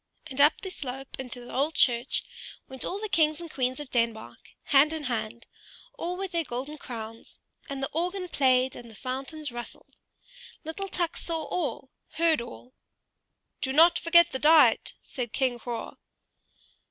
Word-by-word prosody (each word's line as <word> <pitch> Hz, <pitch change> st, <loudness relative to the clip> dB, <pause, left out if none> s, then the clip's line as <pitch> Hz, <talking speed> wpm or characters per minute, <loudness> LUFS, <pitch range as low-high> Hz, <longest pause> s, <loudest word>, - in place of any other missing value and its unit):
And 285 Hz, -3 st, 0 dB
up 295 Hz, +2 st, +5 dB
the 380 Hz, -, -5 dB
slope 270 Hz, -4 st, -6 dB
into 250 Hz, -1 st, -4 dB
the 240 Hz, -, -10 dB
old 290 Hz, +5 st, 0 dB
church 240 Hz, 0 st, +3 dB, 0.4 s
went 265 Hz, -1 st, -7 dB
all 390 Hz, -, -3 dB
the 430 Hz, -, -3 dB
kings 310 Hz, -5 st, +2 dB
and 335 Hz, -2 st, -8 dB
queens 255 Hz, +1 st, -1 dB
of 290 Hz, -3 st, -8 dB
Denmark, 230 Hz, -2 st, -2 dB
hand 290 Hz, +3 st, +5 dB
in 315 Hz, -1 st, -4 dB
hand, 235 Hz, -2 st, -3 dB, 0.5 s
all 355 Hz, +2 st, -4 dB
with 385 Hz, -1 st, -4 dB
their 335 Hz, -1 st, 0 dB
golden 275 Hz, +3 st, -5 dB
crowns; 225 Hz, -3 st, -8 dB, 0.3 s
and 275 Hz, -1 st, -4 dB
the -, -, -1 dB
organ 360 Hz, +3 st, -1 dB
played 260 Hz, -5 st, +3 dB
and 235 Hz, -, -10 dB
the 220 Hz, -, -13 dB
fountains 270 Hz, +5 st, -5 dB
rustled. 240 Hz, 0 st, -9 dB, 0.7 s
Little 390 Hz, +5 st, -5 dB
Tuk 345 Hz, -3 st, -1 dB
saw 325 Hz, -2 st, -3 dB
all, 295 Hz, -6 st, -3 dB, 0.2 s
heard 325 Hz, -3 st, +3 dB
all. 245 Hz, +1 st, -10 dB, 0.9 s
"Do 265 Hz, -, 0 dB
not 335 Hz, +4 st, +6 dB
forget 340 Hz, 0 st, +5 dB
the 260 Hz, -, -3 dB
diet," 310 Hz, +2 st, +5 dB
said 240 Hz, -4 st, -5 dB
King 255 Hz, -3 st, 0 dB
Hroar. 235 Hz, -1 st, -5 dB
275 Hz, 165 wpm, -28 LUFS, 250-325 Hz, 0.9 s, not